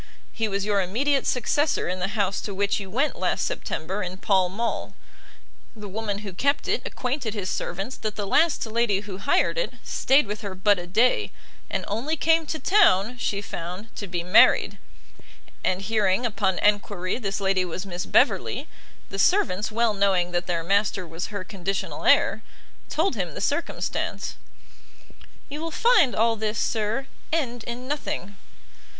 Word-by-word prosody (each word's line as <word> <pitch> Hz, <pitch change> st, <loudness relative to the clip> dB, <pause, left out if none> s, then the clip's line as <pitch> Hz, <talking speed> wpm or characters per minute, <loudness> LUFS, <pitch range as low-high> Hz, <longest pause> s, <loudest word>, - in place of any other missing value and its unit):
He 225 Hz, -1 st, -1 dB
was 200 Hz, -1 st, -2 dB
your 205 Hz, -2 st, +2 dB
immediate 265 Hz, +10 st, +1 dB
successor 290 Hz, +4 st, +1 dB
in 180 Hz, +1 st, -2 dB
the 180 Hz, -, 0 dB
house 200 Hz, -1 st, 0 dB
to 200 Hz, -, -5 dB
which 200 Hz, +1 st, +1 dB
you 195 Hz, -2 st, -7 dB
went 270 Hz, +10 st, 0 dB
last -, -, 0 dB
September 190 Hz, +6 st, -3 dB
in 185 Hz, 0 st, -4 dB
Pall 190 Hz, -2 st, +2 dB
Mall; 230 Hz, +5 st, -3 dB, 0.8 s
the 210 Hz, -1 st, -8 dB
woman 210 Hz, 0 st, -4 dB
who 195 Hz, -, -6 dB
kept 280 Hz, +10 st, 0 dB
it -, -, +1 dB
acquainted 250 Hz, -3 st, -3 dB
his 195 Hz, -3 st, -3 dB
servants 195 Hz, +8 st, -4 dB
that 215 Hz, -1 st, -4 dB
the 205 Hz, -, -3 dB
last 315 Hz, +9 st, +2 dB
lady 220 Hz, -3 st, +1 dB
who 200 Hz, -2 st, -8 dB
hired 280 Hz, -, +2 dB
it -, -, -2 dB
stayed 270 Hz, +1 st, +3 dB
with 210 Hz, +1 st, -5 dB
her 200 Hz, -3 st, -5 dB
but 200 Hz, +1 st, +3 dB
a 175 Hz, -, -7 dB
day, 225 Hz, +8 st, +2 dB, 0.4 s
and -, -, -2 dB
only 255 Hz, +10 st, -1 dB
came 325 Hz, +1 st, +3 dB
to 315 Hz, -, -2 dB
town, 250 Hz, -, +3 dB
she 205 Hz, -2 st, -1 dB
found, 180 Hz, +4 st, -7 dB
to 200 Hz, -, -5 dB
be 175 Hz, -1 st, -3 dB
married: 180 Hz, +3 st, +5 dB, 0.8 s
and 185 Hz, +1 st, 0 dB
hearing, 210 Hz, +1 st, +1 dB
upon 200 Hz, -5 st, 0 dB
enquiry, 205 Hz, -1 st, +1 dB
this 200 Hz, -4 st, -2 dB
lady 195 Hz, -1 st, +2 dB
was 180 Hz, +2 st, -5 dB
Miss 180 Hz, -1 st, -5 dB
Beverley, -, -, +2 dB, 0.4 s
the 195 Hz, -, -4 dB
servants, 220 Hz, -, +2 dB
well 230 Hz, 0 st, +2 dB
knowing 190 Hz, -3 st, +2 dB
that 175 Hz, 0 st, -1 dB
their 170 Hz, -2 st, -1 dB
master 200 Hz, +1 st, +1 dB
was 165 Hz, +1 st, -5 dB
her 200 Hz, -3 st, -5 dB
conditional 195 Hz, 0 st, -4 dB
heir, -, -, +4 dB, 0.5 s
told 325 Hz, +3 st, +1 dB
him 180 Hz, -, -3 dB
the -, -, -5 dB
circumstance." 290 Hz, +11 st, -2 dB, 1.1 s
"You 295 Hz, +2 st, -6 dB
will 330 Hz, -, -3 dB
find 445 Hz, -, +4 dB
all 225 Hz, +1 st, +3 dB
this, 215 Hz, +1 st, -2 dB
sir, 225 Hz, +4 st, -1 dB, 0.3 s
end 245 Hz, -8 st, -1 dB
in 245 Hz, +2 st, -6 dB
nothing." 205 Hz, -, -4 dB
205 Hz, 170 wpm, -25 LUFS, 190-245 Hz, 1.1 s, married